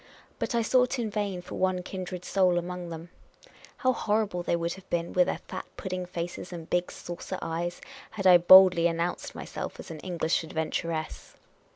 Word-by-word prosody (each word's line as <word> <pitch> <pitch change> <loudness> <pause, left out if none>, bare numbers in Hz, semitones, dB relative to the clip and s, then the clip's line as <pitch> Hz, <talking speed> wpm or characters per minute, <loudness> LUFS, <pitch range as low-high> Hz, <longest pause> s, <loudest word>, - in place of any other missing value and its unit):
But - - -2
I 230 - +2
sought 250 +3 +3
in 225 -3 -2
vain 200 -4 -2
foi - - -9
one 185 -1 +1
kindred 180 -1 -6
soul 185 -3 +3
among 175 0 -4
them. 165 +1 -8 0.7
How 255 -1 +2
horrified 205 -6 -1
they - - +3
would 170 0 -1
have 190 -1 -14
been, 170 0 -1
with 180 -1 +4
their - - -2
fat - - -6
pudding 185 -2 -4
faces 175 +1 -5
and 165 -2 -7
big 175 0 0
saucer 175 +2 -6
eyes, 170 +2 -3 0.3
had 195 -3 -6
I 180 -1 +8
boldly 180 -1 +8
announced 170 +1 -2
myself - - -6
as - - -8
an 160 - -7
English 170 -2 -1
adventuress 160 0 -3
180 Hz, 180 wpm, -28 LUFS, 170-190 Hz, 0.7 s, I